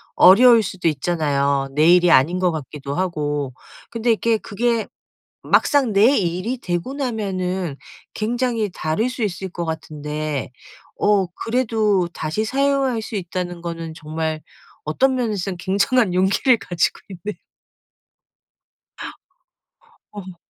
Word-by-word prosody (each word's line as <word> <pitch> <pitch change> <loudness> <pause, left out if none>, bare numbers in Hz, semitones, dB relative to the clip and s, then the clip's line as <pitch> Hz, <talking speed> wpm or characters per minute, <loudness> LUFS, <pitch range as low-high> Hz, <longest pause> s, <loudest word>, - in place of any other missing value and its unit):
어려울 230 +5 +7
수도 185 -4 -3
있잖아요 140 -3 0
내 155 +2 +4
일이 180 -1 +5
아닌 165 +7 +4
것 180 -1 +2
같기도 145 -2 -6
하고. 145 -6 -2 0.4
근데 230 +1 -2
이렇게 225 +2 +2
그게 230 +2 -1 0.6
막상 270 -7 +3
내 225 +8 +5
일이 185 +7 -1
되고 175 +6 -3
나면은 190 - -3 0.4
굉장히 230 -1 -1
다를 160 +12 -1
수 250 -2 -4
있을 190 -2 -3
것 175 0 -5
같은데 150 -3 -4 0.5
어 205 -3 +3
그래도 215 -2 0
다시 160 +8 -2
사용할 270 -1 +1
수 220 - -7
있다는 175 -2 -4
거는 165 -2 -5
정말 155 0 -4 0.4
어떤 260 - +1
면에서는 205 -7 -2
굉장한 200 +4 +1
용기를 195 +7 +3
가지고 175 -2 -1
있네 200 +2 -7 2.7
어허. 190 -3 -9
185 Hz, 250 characters per minute, -21 LUFS, 160-225 Hz, 2.7 s, 어려울